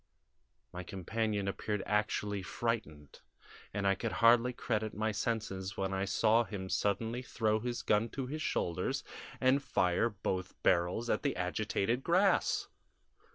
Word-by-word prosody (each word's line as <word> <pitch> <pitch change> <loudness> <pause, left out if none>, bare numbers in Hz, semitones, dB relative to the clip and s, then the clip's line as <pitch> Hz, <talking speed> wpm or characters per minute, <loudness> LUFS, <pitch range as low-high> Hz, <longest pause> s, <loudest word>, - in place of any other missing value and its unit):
My 90 - -5
companion 100 +3 -2
appeared 105 +1 -2
actually 105 -1 0
frightened, 95 -9 -3 0.5
and 100 0 -2
I 100 - +5
could 110 +3 -3
hardly 115 +2 +5
credit 110 -3 -2
my 110 +1 0
senses 105 -3 -3
when 95 0 -1
I 95 +1 0
saw 110 +4 +3
him 95 -4 -6
suddenly 115 +5 0
throw 110 -3 0
his 120 +1 -3
gun 105 +2 +2
to 135 - -1
his 155 +4 -5
shoulders 85 - -1 0.4
and 130 +2 +4
fire 90 -4 +2
both 95 -3 -3
barrels 90 +6 +2
at 105 - +1
the - - 0
agitated 105 +6 -1
grass! 185 +4 +3
105 Hz, 140 wpm, -33 LUFS, 95-115 Hz, 0.5 s, I